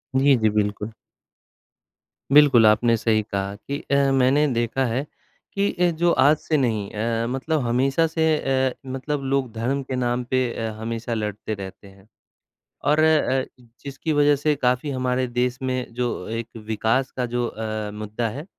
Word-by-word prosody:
जी, 135 0 +5
जी 110 -1 +2
बिल्कुल। 105 +1 -1 1.4
बिल्कुल, 140 -6 +7
आपने 115 +2 +4
सही 110 -1 +2
कहा 100 0 -2
कि 140 +7 -6
अ, 140 -1 +1
मैंने 135 +3 +3
देखा 120 +3 0
है 125 +5 -1 0.5
कि 200 0 0
ए 175 -1 +3
जो 175 0 +4
आज 150 +3 +6
से 155 -1 -1
नहीं 110 -6 0
अ, 115 +2 -1
मतलब 140 +5 -1
हमेशा 135 +7 +2
से 160 0 0 0.4
अ, - - -8 0.2
मतलब 135 +2 -3
लोग 135 -3 -1
धर्म 130 +5 -1
के 130 0 -4
नाम 125 0 -1
पे 130 0 +3
अ, 115 -1 -3
हमेशा 115 +1 -4
लड़ते 105 0 -3
रहते 100 0 -9
हैं। 95 +1 -19 0.8
और 155 - +3
अ, 150 -4 +3 0.4
जिसकी 140 +3 -3
वजह 145 0 +4
से 150 +1 +1
काफ़ी 125 +2 0
हमारे 130 -1 -1
देश 125 +1 -1
में 130 -2 -3
जो 120 -6 -3
एक 115 0 -4 0.2
विकास 115 +5 0
का 125 - 0
जो 120 0 +1
अ, 110 -1 -4
मुद्दा 110 +2 -3
है 145 +9 -7
125 Hz, 165 wpm, -23 LUFS, 110-140 Hz, 1.4 s, बिल्कुल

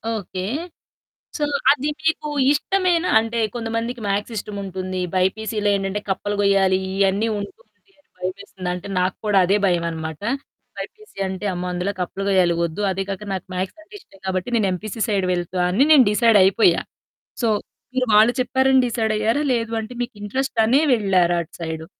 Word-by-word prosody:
Okay. 185 -3 -5 0.9
So, 300 - -2 0.3
అది 290 +1 0
మీకు 320 -1 0 0.2
ఇష్టమేనా? 360 +3 +1
అంటే, 225 +1 -2 0.2
కొంతమందికి 230 +1 -3
మ్యాథ్స్ 205 +3 -1
ఇష్టముంటుంది. 190 -2 -4
బైపీసీలో 205 +3 0
ఏంటంటే 195 +1 -2
కప్పలు 205 +2 -1
గొయ్యాలి, 195 -2 +3
ఇయన్నీ 195 +3 +1
ఉంటుంది 430 - -9 0.3
అని 290 - -29 0.2
భయమేస్తుంది. 185 0 -5
అంటే, 180 +2 -6
నాకు 180 0 0
కూడా 210 -2 +3
అదే 195 +3 +3
భయమనమాట. 165 -3 -1 0.6
బైపీసీ 430 - -9
అంటే, 190 +2 -5
అమ్మో! 180 +1 -4
అందులో 180 +3 -2
కప్పలు 195 +2 -4
గొయ్యాలి 180 -3 +3
ఒద్దు. 170 +4 -5
అదీ 195 +1 -2
కాక 195 +1 -4
నాకు 190 - -4
మ్యాథ్స్ 185 - -3
అంటే 385 +6 -21
ఇష్టం 195 - -21
గాబట్టి 185 +4 -1
నేను 200 -4 +2
ఎంపీసీ 215 +4 -6
సైడ్ 195 -4 0
వెళ్తా 180 +1 -2
అని 205 +9 +3
నేను 280 -5 +8
డిసైడ్ 225 0 +5
అయిపోయా. 190 -2 +4 0.6
సో, 230 - +3 0.5
మీరు 255 -1 +1
వాళ్ళు 215 +3 +6
చెప్పారని 265 +1 +3
డిసైడ్ 225 -2 0
అయ్యారా? 225 +7 +1
లేదు 230 -1 -1
అంటే, 220 +2 -8
మీకు 240 - -5
ఇంట్రెస్ట్ 265 +4 -3
అనే 260 +6 +4
వెళ్లారా 185 -5 +2
అటు 160 - -16
సైడు? 160 -1 -4
200 Hz, 160 wpm, -22 LUFS, 185-235 Hz, 0.9 s, నేను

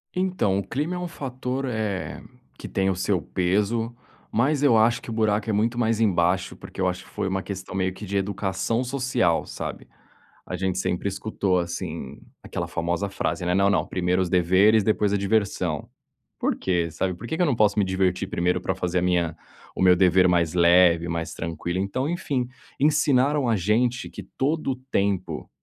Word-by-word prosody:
Então, 180 - +1
o - - -3
clima 150 +7 -2
é - - -3
um 180 - -3
fator, 130 -3 -4
eh, 110 -6 -3 0.4
que - - -8
tem 95 0 0
o 95 - 0
seu 90 -1 0
peso, 105 +6 0 0.4
mas 135 +5 +2
eu 125 -6 +5
acho 115 +2 +3
que - - -10
o - - -3
buraco 110 -1 +1
é - - +1
muito 115 +3 +1
mais 115 -1 +1
embaixo. 90 -2 +1
Porque - - -8
eu 95 - +2
acho 90 0 -3
que - - -18
foi - - -3
uma 95 0 -1
questão 95 -2 -7
meio 95 -1 0
que 105 - -8
de 100 +1 -2
educação 100 +4 -1
social, 125 -9 0
sabe. - - -6 0.6
A 90 - -4
gente 95 0 -1
sempre 90 +2 -1
escutou 95 -2 0
assim 85 0 -5 0.2
aquela - - -4
famosa 85 +4 -2
frase, 95 -2 -2
né: 90 - +1
"Não 100 +1 +3
não, - - +2
primeiro 90 0 0
os 90 - -1
deveres, 95 +5 +4
depois 105 -1 +1
a - - +3
diversão". 100 -6 0 0.5
Por - - +1
quê? 85 -3 0
Sabe. 90 +3 -1
Por 115 - -9
que 160 - -2
que - - 0
eu - - +4
não 135 - +2
posso 105 -1 +3
me 100 - +3
divertir 95 0 0
primeiro 90 +1 +1
pra 95 - -1
fazer 90 -1 -1
a - - -2
minha 85 -3 +1 0.4
o - - -4
meu 90 -1 +6
dever 90 0 +5
mais 85 -2 +2
leve, 85 -1 +5
mais 85 -1 -3
tranquilo? 85 +2 -3
Então 130 +9 -1
enfim, 135 -8 -1 0.3
ensinaram 145 -2 +3
a 115 - +3
gente 115 +6 +1
que - - -9
todo 145 +1 0
o - - -2 0.2
tempo 100 -2 -1
100 Hz, 195 wpm, -24 LUFS, 90-115 Hz, 0.6 s, meu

